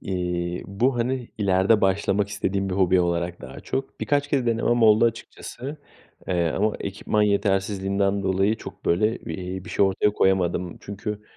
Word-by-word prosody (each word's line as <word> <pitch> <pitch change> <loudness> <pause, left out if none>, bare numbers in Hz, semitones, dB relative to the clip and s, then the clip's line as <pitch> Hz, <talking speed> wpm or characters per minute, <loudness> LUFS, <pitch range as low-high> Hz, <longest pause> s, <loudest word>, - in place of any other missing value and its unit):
eee, 90 -2 -3
bu, 120 +7 0
hani, 125 +1 -1
ileride 100 +1 +3
başlamak 100 +1 +1
istediğim 100 -1 -2
bir 90 - -2
hobi 95 -1 +3
olarak 85 0 -1
daha - - -9
çok 135 0 -4
Birkaç 145 0 0
kere 135 -4 0
denemem 115 +1 +1
oldu 110 +1 +6
açıkçası, 120 +4 -4 0.5
eee, 85 -2 +1
ama 105 +2 +1
ekipman 105 +2 -1
yetersizliğinden 100 -1 +1
dolayı 95 +3 +1
çok, - - -11
böyle, 105 +7 +2
iii, 90 +2 -6
bir 110 - -9
şey - - +3
ortaya 95 +2 +2
koyamadım 90 -3 +1
çünkü, 105 +1 -6
100 Hz, 155 wpm, -24 LUFS, 95-110 Hz, 0.5 s, oldu